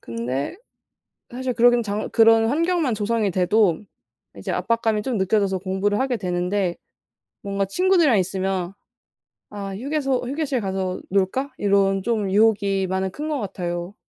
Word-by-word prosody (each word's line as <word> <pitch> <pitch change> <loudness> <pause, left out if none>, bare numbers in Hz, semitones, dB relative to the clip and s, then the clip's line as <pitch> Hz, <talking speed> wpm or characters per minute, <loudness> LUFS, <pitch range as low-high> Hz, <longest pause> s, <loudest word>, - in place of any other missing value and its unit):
근데 125 - -4 0.8
사실 255 0 -3
그러기는 240 0 +4
장 210 +1 -3
그런 225 0 +5
환경만 325 -3 +1
조성이 210 -1 0
돼도 185 0 +2 0.6
이제 - - -4
압박감이 225 -2 0
좀 250 -5 -2
느껴져서 190 0 +1
공부를 195 +3 -1
하게 260 -3 0
되는데 180 0 -1 0.7
뭔가 200 0 -2
친구들이랑 335 - +3
있으면 190 0 -2 0.8
"아. 200 -2 -6
휴게소 270 0 -1
휴게실 280 -3 -1
가서 190 -2 -3
놀까?" 200 +9 0
이런 195 -1 +2
좀 215 -4 -1
유혹이 200 -2 +2
많이 190 0 -1
큰 300 +9 -5
것 295 -2 -1
같아요. 175 -1 -4
205 Hz, 305 characters per minute, -22 LUFS, 190-240 Hz, 0.8 s, 그런